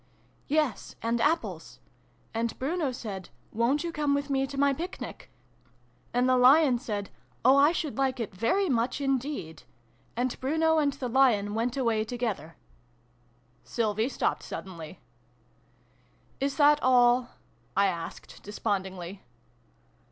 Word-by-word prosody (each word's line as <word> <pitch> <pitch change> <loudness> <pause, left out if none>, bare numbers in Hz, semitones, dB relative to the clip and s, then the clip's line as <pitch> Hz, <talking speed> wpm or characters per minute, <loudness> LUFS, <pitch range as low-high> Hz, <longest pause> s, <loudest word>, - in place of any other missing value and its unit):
" - - -36
Yes, 300 -4 0
'and 230 +1 0
apples.' 325 +5 -1 0.5
And 230 0 -2
Bruno 295 +1 -1
said 205 -7 -7 0.2
'Won't 245 +7 +1
you 340 - -3
come 295 -3 +1
with 285 0 -2
me 270 0 +1
to 275 - -8
my 280 0 +3
Picnic? 340 +7 -7 0.5
' - - -36
And 245 +1 +2
the 255 0 +4
Lion 260 0 +6
said 205 -5 -4 0.2
' - - -32
Oh, 260 +2 +7
I 285 +3 +6
should 305 -5 -3
like 265 -2 +1
it 220 -3 -4
very 300 - +1
much 245 -2 0
in 270 -2 +1
deed 205 - -6 0.3
/ 120 - -36
' - - -35
And 250 +1 -1
Bruno 320 +4 +2
and 285 -2 +1
the 255 - -4
Lion 235 -5 +3
went 235 +4 -1
away 230 -4 +1
together." 215 - -4 1.1
Sylvie 220 +1 -1
stopped - - -1
suddenly. 170 -3 -8 0.8
" 125 0 -36
Is 275 0 -1
that 295 0 +5
all?" 245 -1 +4 0.5
I 200 - +5
asked, 170 -3 -5
despondingly. 190 -2 -4
250 Hz, 150 wpm, -28 LUFS, 210-280 Hz, 1.1 s, Oh